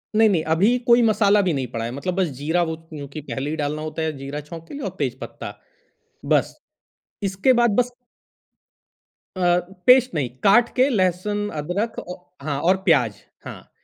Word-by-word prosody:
नहीं, 220 0 +5
नहीं, 165 -5 +1
अभी 220 +8 +3
कोई 240 0 +6
मसाला 210 -2 +4
भी 180 -4 0
नहीं 130 -3 -2
पड़ा 115 -1 -3
है। 120 - -4
मतलब 175 +8 -3
बस 190 -3 +1
ज़ीरा 160 +5 0
वो 160 -1 -3
क्योंकि 155 -2 -9
पहले 140 0 -4
भी - - -2
डालना 150 0 -2
होता 155 +1 -4
है 160 0 0
ज़ीरा 140 +2 -6
छोंक 165 +2 -10
के - - -11
लिए 285 - -6
और - - -4
तेज - - -2
पत्ता। - - -8 0.7
बस। - - +1 0.7
इसके 195 +7 +2
बाद 235 -3 +3
बस 245 +1 +2 1.4
अ, 175 -1 +3 0.3
पेस्ट 255 0 +6
नहीं 135 -5 -1
काट 230 +4 +5
के 260 +2 +4
लहसुन 205 0 0
अदरक 200 +9 -3
औ 180 - -7 0.3
हाँ 140 -1 -2
और 185 +3 +3
प्याज़ 130 - +3 0.3
हाँ। - - -10
180 Hz, 180 wpm, -22 LUFS, 150-210 Hz, 1.4 s, कोई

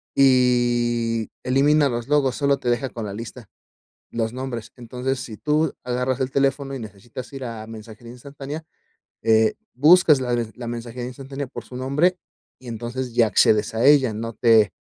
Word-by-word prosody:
Y 120 -3 +2
elimina 140 +3 +3
los 120 -1 -3
logos, 140 -3 +2
sólo 140 -1 +2
te 125 -2 -3
deja 125 +2 0
con 115 -3 -6
la 100 - -5
lista, 115 +3 -8 0.7
los 115 -1 -2
nombres, 125 -3 -5
entonces, 125 +2 -3
si 115 -4 -7
tú 150 +1 +1
agarras 125 +1 -1
el 130 0 -1
teléfono 135 0 0
y - - -5
necesitas 115 +4 -9
ir 135 -1 -6
a 115 -2 -6
mensajería 115 +1 -11
instantánea, 140 +4 -8 0.6
eh, 110 -1 +3 0.2
buscas 150 +1 +6
la 125 -1 -1 0.2
la 120 -1 -7
mensajería 120 +1 -5
instantánea 135 +2 -6
por - - -9
su 125 - -11
nombre, 145 +8 +1 0.4
y 130 - -14
entonces, 120 +2 -5
ya 115 -1 +4
accedes 110 +1 +3
a 115 +4 +1
ella, 140 -5 +5
no 115 +2 -5
te 110 -3 +4
125 Hz, 165 wpm, -23 LUFS, 115-135 Hz, 0.7 s, buscas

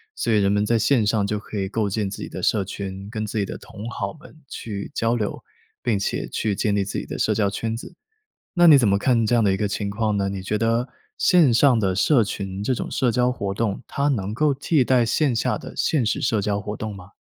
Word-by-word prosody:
所 115 - 0
以 105 - +4
人 100 0 +2
们 105 0 +2
在 115 +1 +2
线 120 -3 +3
上 105 -1 +1
就 105 +1 -1
可 105 - -9
以 95 0 -2
构 110 -1 0
建 100 0 -1
自 95 - -7
己 - - -5
的 - - -7
社 105 - +2
群， 95 0 -6
跟 110 0 -4
自 110 +1 -4
己 100 - +1
的 - - -6
同 105 +3 -9
好 100 -3 -4
们 165 - -15
去 100 -3 -6
交 115 +1 +1
流， 105 -3 -3 0.4
并 115 -4 +1
且 100 - -2
去 110 -2 -1
建 105 0 0
立 100 - +1
自 95 - -3
己 - - -6
的 - - -6
社 - - +1
交 100 -2 +1
圈 110 +3 -3
子。 125 +9 -9 0.6
那 175 -2 +4
你 150 -3 +9
怎 120 -5 +3
么 100 0 +3
看 115 0 +2
这 120 - +2
样 115 - +3
的 100 - +3
一 - - -1
个 105 - 0
情 100 0 -3
况 105 0 -1
呢？ 100 -1 0
你 95 -1 -4
觉 105 +3 -1
得 115 +3 +1 0.3
线 170 -9 +5
上 120 0 +5
的 95 -3 +1
社 120 +5 +4
群 100 -1 -5
这 130 - +1
种 - - -4
社 125 -3 +1
交 125 +2 +2
活 100 -6 -3
动， 105 +2 -2
它 140 +1 -1
能 105 -7 -1
够 150 +4 +2
替 140 0 +2
代 125 -1 +3
线 135 +2 +1
下 115 - 0
的 - - -10
现 150 -6 +1
实 110 - 0
社 110 -3 +1
交 100 0 -1
活 105 +1 -5
动 110 -1 -5
吗？ 95 0 -13
110 Hz, 280 characters per minute, -23 LUFS, 100-120 Hz, 0.6 s, 你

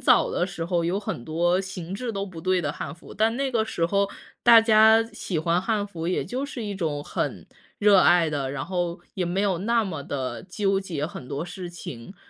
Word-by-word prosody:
早 - - +4
的 - - 0
时 175 -3 -5
候 170 -1 0
有 175 +4 0
很 120 - -5
多 175 +3 +1
形 185 -2 -6
制 235 +4 -3
都 200 0 -3
不 175 -4 -9
对 185 +1 +1
的 170 - -2
汉 140 - -6
服， 170 - -13
但 225 +2 +2
那 275 0 -1
个 230 -3 +1
时 170 -6 -1
候 200 +2 +1 0.3
大 235 -1 +9
家 220 0 +6
喜 185 -5 -3
欢 170 +3 +1
汉 205 +1 0
服 170 -5 -6
也 180 - 0
就 255 +8 -3
是 255 -4 -6
一 205 -1 -4
种 155 -6 -2
很， - - -3 0.3
热 205 -2 +6
爱 175 -3 +5
的， 140 -3 -2
然 140 -2 -3
后 175 -1 -2
也 185 -3 -1
没 175 +3 -1
有 195 -4 +1
那 230 +4 +1
么 160 -7 -4
地 135 -2 -4
纠 195 +1 +1
结 165 -7 -3
很 130 -6 -9
多 145 +4 -3
事 180 0 -7
情。 170 -3 -9
185 Hz, 240 characters per minute, -25 LUFS, 165-205 Hz, 0.3 s, 大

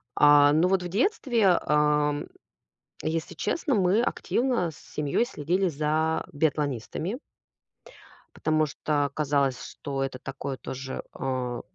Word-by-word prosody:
А, 145 -1 +7
ну 160 +4 +4
вот 190 -1 +1
в - - -3
детстве, 230 - +2
ам, 150 -1 +1 0.8
если 160 0 -2
честно, 300 -5 -1
мы 200 +2 +3
активно 240 -7 0
с 155 - -14
семьёй 150 +9 -1
следили 185 - 0
за 155 +1 0
биатлонистами. 150 - -1 1.2
Потому 155 0 +1
что 145 -1 -1
казалось, 140 -3 +1
что 135 -1 -4
это 135 -1 -4
такое 135 +1 -5
тоже, 130 +1 -6 0.2
э, 125 -2 -2
150 Hz, 120 wpm, -27 LUFS, 140-180 Hz, 1.2 s, А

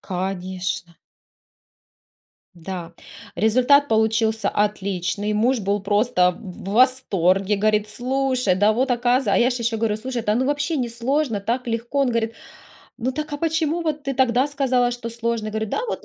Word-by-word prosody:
Конечно! 185 -2 -4 1.6
Да, 170 -1 -7 0.4
результат 255 +8 +4
получился 220 0 +1
отличный, 205 0 -1
муж 235 +3 +2
был 200 +1 0
просто 200 -3 +2
в 190 -2 -9
восторге, 205 -5 +2
говорит: 215 +1 +1
"Слушай, 255 -2 0
да 210 +2 +3
вот 260 +3 0
оказ". 245 +1 +2
А 200 - +3
я 240 - +4
же 250 - -2
еще 225 -1 -1
говорю: 215 -1 0
"Слушай, 240 +1 -4
да 210 -1 +1
ну 255 +3 +1
вообще 290 +3 0
не 245 -4 -2
сложно, 240 -1 -1
так 240 +5 -2
легко!" 235 +4 -2
Он 265 -3 +2
говорит: 230 -1 -1 0.6
"Ну 255 +2 -1
так, 305 +1 -5
а 290 - -3
почему 325 +1 0
вот 305 -3 -2
ты 275 0 -3
тогда 255 +1 +2
сказала, 260 -4 +1
что 240 -1 -5
сложно?" 230 -1 -2
Говорю: 220 +1 -3
"Да 435 - -1
вот". - - -4
230 Hz, 160 wpm, -22 LUFS, 205-260 Hz, 1.6 s, результат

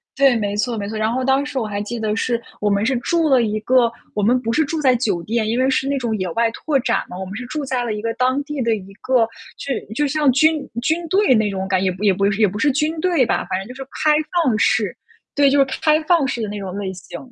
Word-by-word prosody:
对， 270 -2 +4
没 205 -2 -1
错 230 +2 -1
没 200 -1 -4
错。 220 - -5
然 215 +1 0
后 255 +2 -1
当 270 +1 +2
时 285 - -6
我 230 - 0
还 205 0 -3
记 235 +2 -5
得 215 -1 -1
是 235 +1 0 0.2
我 210 - +1
们 200 +1 +1
是 260 +1 +1
住 325 +6 +1
了 260 -3 +5
一 215 0 -1
个 240 0 +3 0.2
我 210 - -1
们 245 +4 +3
不 230 -1 -2
是 315 - +3
住 315 +2 -3
在 260 -3 +4
酒 200 -8 -1
店， 220 +3 -1
因 235 +3 0
为 260 - +3
是 270 0 0
那 280 - 0
种 235 -4 -1
野 185 -2 -2
外 230 +2 +1
拓 280 +2 -1
展 - - 0
嘛， 180 - -8
我 190 - -5
们 190 +2 -8
是 250 - -5
住 285 +2 -4
在 255 -2 -1
了 230 -3 -2
一 210 - -4
个 230 0 -1
当 255 +3 +1
地 295 -1 -4
的 230 -2 +1
一 195 -1 -10
个 250 -4 +2 0.3
就 275 - -3 0.2
就 295 +1 +1
像 290 -1 +2
军 310 +2 +2
军 330 +5 -1
队 390 -6 +4
那 220 -1 +2
种 190 -1 -3
感 185 -1 +1
觉， 190 - +1
也 - - +2
不 185 +3 -8
也 195 - +5
不 195 +2 0 0.2
也 210 - +6
不 205 +3 -5
是 290 +1 +3
军 310 +3 -1
队 340 -7 +2
吧， - - 0
反 185 - 0
正 195 - -8
就 250 - -9
是 270 - -7 0.2
开 305 - +5 0.3
放 245 - +2
式， - - +1 0.4
对， 285 -1 +5
就 285 - +2
是 275 - +5 0.2
开 310 0 +3
放 315 -4 +3
式 245 -4 -3
的 210 - -3
那 205 0 -5
种 190 -1 -6
类 190 -2 -4
型。 180 - -9
240 Hz, 310 characters per minute, -20 LUFS, 210-275 Hz, 0.4 s, 也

